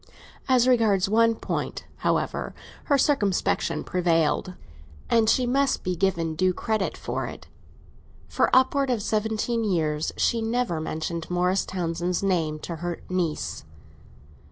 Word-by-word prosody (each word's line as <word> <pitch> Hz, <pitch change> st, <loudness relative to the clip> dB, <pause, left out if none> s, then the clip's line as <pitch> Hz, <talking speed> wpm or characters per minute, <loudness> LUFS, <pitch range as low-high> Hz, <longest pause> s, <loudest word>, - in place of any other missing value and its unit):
As 255 Hz, -1 st, +4 dB
regards 220 Hz, -7 st, +3 dB
one 230 Hz, +2 st, +3 dB
point, -, -, -4 dB
however, -, -, -1 dB, 0.3 s
her 285 Hz, -, +3 dB
circumspection 220 Hz, -10 st, +1 dB
prevailed, 175 Hz, 0 st, +1 dB, 0.6 s
and 225 Hz, -2 st, +4 dB
she 255 Hz, -, +3 dB
must 270 Hz, +2 st, +1 dB
be 180 Hz, 0 st, -1 dB
given 170 Hz, -3 st, 0 dB
due 185 Hz, +3 st, +1 dB
credit 215 Hz, -3 st, -1 dB
for -, -, -3 dB
it. -, -, -9 dB, 0.8 s
For -, -, +1 dB
upwards 260 Hz, +1 st, +3 dB
of 225 Hz, -4 st, -1 dB
seventeen 220 Hz, +2 st, 0 dB
years 160 Hz, -6 st, 0 dB
she 230 Hz, -, +1 dB
never 225 Hz, -6 st, -1 dB
mentioned 160 Hz, +1 st, -4 dB
Morris 180 Hz, +2 st, +1 dB
Townsend's 175 Hz, 0 st, -2 dB
name 165 Hz, -6 st, 0 dB
to 170 Hz, -, -5 dB
her 175 Hz, +1 st, -4 dB
niece. 175 Hz, -4 st, -2 dB
190 Hz, 130 wpm, -25 LUFS, 170-230 Hz, 0.8 s, As